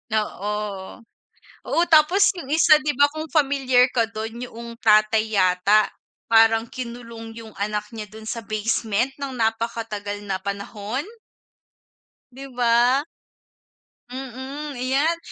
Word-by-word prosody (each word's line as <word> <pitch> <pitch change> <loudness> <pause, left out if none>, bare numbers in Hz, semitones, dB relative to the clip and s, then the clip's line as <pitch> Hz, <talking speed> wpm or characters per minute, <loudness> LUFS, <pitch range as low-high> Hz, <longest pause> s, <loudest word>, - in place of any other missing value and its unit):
Oo, 210 0 -2 1.0
oo, 335 - +1
tapos 330 +6 +5
yung 300 - -7
isa, 310 -1 +6
di 300 -1 -2
ba, 285 0 +4
kung 310 +1 -6
familiar 270 -5 +3
ka 230 -2 +1
dun 225 +1 -6
yuong 235 0 -10
tatay 215 0 +3
yata, 190 +2 +3 0.4
parang 225 0 +4
kinulong 235 -2 -8
yung 220 - -11
anak 210 +1 -3
niya 220 -2 -7
dun 220 +2 -13
sa 235 - -3
basement 220 +2 -1
nang 275 -2 -5
napakatagal 225 -3 -2
na 195 -2 -3
panahon. 200 +5 -4 1.3
Di 265 +2 -10
ba? 245 +2 +3 1.1
Mm, 265 +3 -6
ayan, 280 +7 +1
230 Hz, 120 wpm, -23 LUFS, 215-265 Hz, 1.3 s, isa